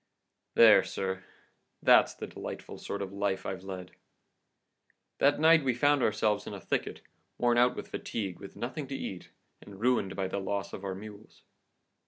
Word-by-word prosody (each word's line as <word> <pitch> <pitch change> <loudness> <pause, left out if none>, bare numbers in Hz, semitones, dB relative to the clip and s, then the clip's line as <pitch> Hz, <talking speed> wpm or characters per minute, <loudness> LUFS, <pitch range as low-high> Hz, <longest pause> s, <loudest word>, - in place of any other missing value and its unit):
"There, - - +8
sir; 95 -1 -4 0.6
that's - - +6
the - - -6
delightful - - -8
sort 100 0 -4
of 95 0 -7
life 100 -1 -1
I've 95 -1 -4
led! 95 -2 -7 1.3
That 145 +1 +4
night 160 0 +6
we 130 -3 +1
found 145 +2 +3
ourselves 105 -2 +1
in - - -5
a - - -7
thicket, - - -3 0.4
worn 120 -1 +3
out 125 +1 +4
with - - -7
fatigue, 95 -6 -4
with 100 - -11
nothing 135 +4 -5
to 135 - -5
eat, 95 -8 -6 0.3
and 100 -1 -12
ruined 120 -5 +1
by 95 -1 -1
the 100 - -3
loss 100 0 -3
of 95 - -7
our 95 -1 -3
mules. 105 +1 -12
100 Hz, 170 wpm, -30 LUFS, 95-125 Hz, 1.3 s, There